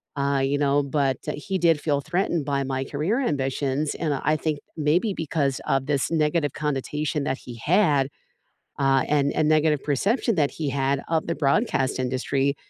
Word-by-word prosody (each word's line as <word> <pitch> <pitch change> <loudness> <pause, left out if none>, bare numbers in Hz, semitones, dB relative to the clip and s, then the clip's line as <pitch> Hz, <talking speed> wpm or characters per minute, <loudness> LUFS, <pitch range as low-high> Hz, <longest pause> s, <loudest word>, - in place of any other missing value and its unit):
uh, 140 0 +1
you 140 +1 +1
know, 145 0 +2
but, 140 -2 0
uh, - - -1
he 190 +5 -3
did 165 -3 +3
feel 145 -2 0
threatened 175 -2 -1
by 140 -1 0
my 135 0 -2
career 160 - -1
ambitions, 140 - -1
and 155 -3 -1
I 155 +3 +1
think 155 -1 -1 0.2
maybe 165 +7 +1
because 145 -4 -1
of 135 -2 +1
this 140 -2 0
negative 155 -2 +1
connotation 150 0 -2
that 135 -1 -1
he 120 -2 -10
had, 150 -6 +3 0.7
uh, 135 -1 +3
and 145 -1 +2
and 155 -1 +2
negative 155 -2 +3
perception 205 - +1
that 145 -3 +2
he 155 -3 -4
had 135 0 0
of 160 -1 0
the 165 - 0
broadcast 140 - +1
industry 135 +2 0
145 Hz, 175 wpm, -24 LUFS, 135-155 Hz, 0.7 s, did